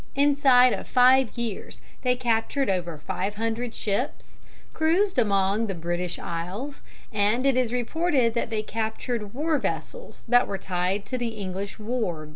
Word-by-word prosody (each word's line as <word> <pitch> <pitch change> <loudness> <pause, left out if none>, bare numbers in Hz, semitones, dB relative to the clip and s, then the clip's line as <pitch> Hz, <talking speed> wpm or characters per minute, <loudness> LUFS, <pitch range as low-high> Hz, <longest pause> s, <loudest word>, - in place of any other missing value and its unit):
Inside 275 -3 +5
of - - -5
five 255 -1 +4
years 230 -4 -5 0.2
they 250 -1 +2
captured 240 +1 0
over 175 -4 -2
five 190 +7 -3
hundred 225 +2 -2
ships, 220 +6 -3 0.4
cruised 335 +1 +2
among 200 0 +2
the 195 - -3
British 175 +1 -2
isles, 185 +12 -5 0.3
and 215 +5 +2
it 275 -2 +4
is 250 -3 +1
reported 250 0 +1
that 235 - -1
they 215 -1 -2
captured 220 0 -3
war 305 +1 +1
vessels - - -5
that 245 +1 +5
were 195 - -3
tied 185 +2 -1
to 255 - -3
the 230 -2 -3
English 195 0 -5
wharves. 210 -9 -3
230 Hz, 150 wpm, -26 LUFS, 200-255 Hz, 0.4 s, Inside